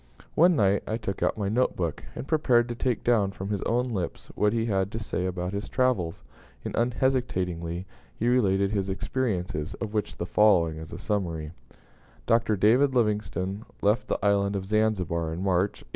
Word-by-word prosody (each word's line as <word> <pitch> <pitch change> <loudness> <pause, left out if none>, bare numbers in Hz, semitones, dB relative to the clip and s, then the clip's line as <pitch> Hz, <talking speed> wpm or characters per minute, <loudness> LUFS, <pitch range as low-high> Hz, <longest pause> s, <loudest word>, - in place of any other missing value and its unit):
One 175 +2 +5
night 100 -4 +3
I 110 - -1
took 100 -4 -5
out - - +1
my 100 -2 -1
note 120 +5 +1
book, 85 -4 -3
and 135 - -6
prepared 125 -7 +3
to - - -2
take 120 -1 -1
down 110 -5 +3
from 100 0 -6
his 100 - -1
own 125 +2 +1
lips 90 -5 -4
what 105 0 +2
he 115 0 0
had 95 -3 0
to 115 - -3
say 95 -4 -2
about 90 0 -3
his 100 +1 -4
travels; 105 - 0 0.4
and - - -3
unhesitatingly 95 -9 0 0.3
he 115 - -1
related 100 -5 +3
his 100 -2 -1
experiences, 95 - -2
of 110 -2 -5
which 105 -2 -2
the 85 - -3
following 90 -6 +3
is 80 -1 -9
a - - -6
summary: 85 -7 -2 0.7
Dr. 115 -1 +3
David 125 +7 +4
Livingstone 105 -3 0 0.2
left 105 +4 +2
the - - 0
Island 100 0 +2
of 95 -1 -3
Zanzibar 95 -6 0
in 85 +3 -4
March, 95 +1 0
1866. - - -29
100 Hz, 185 wpm, -27 LUFS, 90-115 Hz, 0.7 s, One